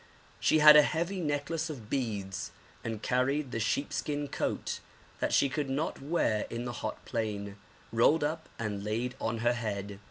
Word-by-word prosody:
She - - +4
had 150 0 +10
a 150 - +10
heavy 170 +5 -1
necklace 155 +1 -1
of 125 -9 -7
beads 100 - -2 0.3
and 115 -2 -4
carried 130 +2 +1
the 115 - -2
sheep 125 +5 0
skin 145 -1 -2
coat, - - -2 0.4
that - - 0
she - - +4
could 145 0 -2
not 140 +3 -2
wear 135 -8 +1
in 120 +1 -4
the 120 - -2
hot 110 - -5
plain, 105 -4 -3 0.3
rolled 145 +7 +4
up 160 +2 -2
and 105 -3 -3
laid 115 +4 -1
on 115 +1 -1
her 120 - +5
head. 100 -4 -4
125 Hz, 170 wpm, -31 LUFS, 110-150 Hz, 0.4 s, had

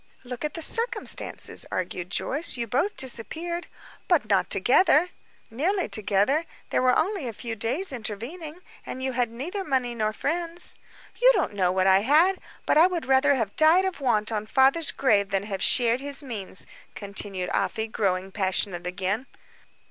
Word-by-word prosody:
"Look 250 +1 -7
at 300 - -3
the 330 - -1
circumstances," 465 +4 +1
argued 180 -1 -4
Joyce. 290 - 0
"You 235 - -2
both 280 - -1
disappeared." 320 +8 -2 0.4
"But - - +2
not - - +1
together." 360 -2 +4 0.4
"Nearly 355 - -1
together. 215 +9 +1 0.3
There - - +1
were 255 -1 +3
only 360 -4 -1
a 230 - -5
few 230 +1 -5
days 255 - -1
intervening. 265 - -7 0.2
And 260 - -7
you 265 - -1
had 245 -2 0
neither 315 - -5
money 260 -6 -1
nor 215 -2 -1
friends." 335 +8 0 0.5
"You - - +7
don't - - -1
know 185 -3 +1
what 185 0 +1
I 190 0 +5
had. 315 - +3 0.3
But 300 - +3
I 335 - +7
would 355 -3 -4
rather 270 +2 +3
have 225 -6 -3
died 325 +5 +5
of 375 -6 -4
want 225 -4 +1
on 215 -1 -3
father's 270 +7 +3
grave 205 -7 +1
than 195 -1 -1
have 195 -2 -5
shared 240 -1 +3
his 285 +1 -1
means," 210 -7 -4 0.3
continued 200 -2 -4
Afy, 220 -1 -1
growing 195 -3 -2
passionate 190 -2 -1
again. 195 +7 -3
250 Hz, 165 wpm, -25 LUFS, 205-315 Hz, 0.5 s, You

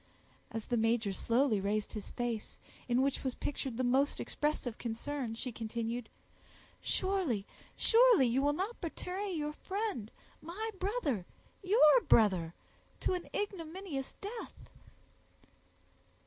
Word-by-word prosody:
As 225 -1 -5
the 240 - 0
major 225 -2 +2
slowly 230 0 +2
raised 205 +2 -1
his 210 -2 -6
face, 235 -3 -3 0.3
in 250 +1 +3
which 275 0 0
was 260 -2 -1
pictured 265 -4 -3
the 255 - 0
most 265 +3 +2
expressive 295 -6 -2
concern, 235 +1 -3
she 250 +2 -4
continued, 230 +1 -3 0.7
"Surely, 355 - 0 0.3
surely, 470 - +6
you 245 +3 +2
will 290 +1 +3
not 390 +9 -3
betray 370 +3 -3
your 300 -3 -2
friend—my 385 - -5
brother—your 380 - +2
brother—to 185 - +1
an 360 -1 -4
ignominious 355 -7 -4
death." 440 +3 -8
270 Hz, 110 wpm, -33 LUFS, 230-370 Hz, 0.7 s, surely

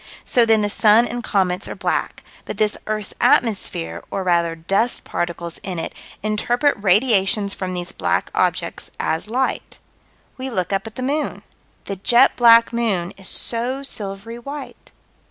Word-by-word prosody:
So 240 -2 +3
then 220 -1 +4
the - - +1
sun 215 +3 +5
and 240 0 -4
comets 185 -3 0
are - - -6
black, - - -2 0.2
but - - -6
this 210 -1 +1
earth's 215 -1 -3
atmosphere, 85 - +1
or, 195 - -3
rather, 170 -2 +1
dust 195 +8 0
particles 170 -1 -4
in 185 -3 -5
it, 165 - -4 0.3
interpret 240 +6 +1
radiations 200 -1 +2
from 185 -1 -4
these 175 0 -4
black - - -1
objects - - -1
as 165 +6 -2
light. 260 +3 -2 0.6
We 260 +1 -4
look 185 -5 -2
up 195 +3 -1
at 220 - -10
the 255 - -5
moon. 295 +4 -2 0.4
The 195 - -5
jet 240 +7 +4
black 230 -1 +6
moon 200 -7 -1
is 195 -1 -5
so 250 +4 +2
silvery 210 -1 -6
white. 280 +2 -9
210 Hz, 155 wpm, -21 LUFS, 185-240 Hz, 0.6 s, black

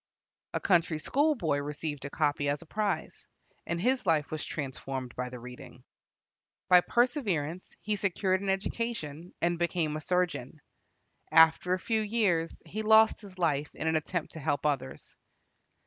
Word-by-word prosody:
A - - +1
country 170 -4 +2
schoolboy 235 - +1
received 145 0 -4
a - - -4
copy 145 -1 0
as 145 +2 -2
a - - -18
prize, 210 +4 -3 0.4
and 170 - -1
his 250 +2 +1
life 155 -3 +2
was 155 -1 -3
transformed 130 -3 -5
by 125 0 -3
the 125 - -8
reading. 125 0 -11 0.9
By 180 -1 +8
perseverance 190 - 0
he 210 0 0
secured 190 -1 0
an 200 - -2
education, 190 -5 -3
and 170 0 +1
became 170 -3 0
a 155 - -4
surgeon. 175 -6 -1 0.7
After 165 +3 +5
a - - -6
few 220 +2 0
years 200 -7 0
he 215 - -4
lost 220 +1 +5
his 195 -3 -12
life 150 -4 +1
in - - -5
an 160 0 +2
attempt 160 +2 -2
to 160 - -8
help 145 0 -1
others. 135 -3 -2
165 Hz, 155 wpm, -30 LUFS, 145-195 Hz, 0.9 s, By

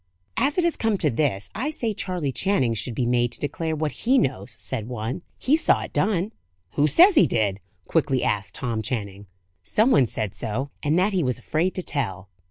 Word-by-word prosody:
"As 285 +4 +1
it 360 - +3
has 340 -1 +1
come 225 -3 +1
to 155 -5 +1
this, 115 -6 -1
I 265 +7 -2
say 235 -8 -2
Charley 180 -8 -2
Channing 135 -7 +1
should 115 +2 -4
be 125 - 0
made 120 0 +2
to - - -6
declare 160 +2 -2
what 155 -1 -1
he 260 +4 +1
knows," 130 - -1
said 115 -5 -3
one. 120 +3 -4 0.2
"He 280 - +3
saw 320 - +3
it - - -9
done!" 205 0 +1 0.4
"Who 150 +1 +2
says 360 - +7
he 305 - +6
did?" 105 -4 0 0.3
quickly 140 -6 +1
asked 100 -1 -1
Tom 115 -4 -2
Channing. 100 -4 -4 0.3
"Some 225 +5 +2
one 130 - +5
said 105 -3 -3
so; 125 +5 -3
and 150 +3 +1
that 195 +3 +2
he 185 - +2
was 125 -2 0
afraid 160 +9 -1
to 185 - -3
tell." 100 - -2
140 Hz, 205 wpm, -24 LUFS, 115-195 Hz, 0.4 s, says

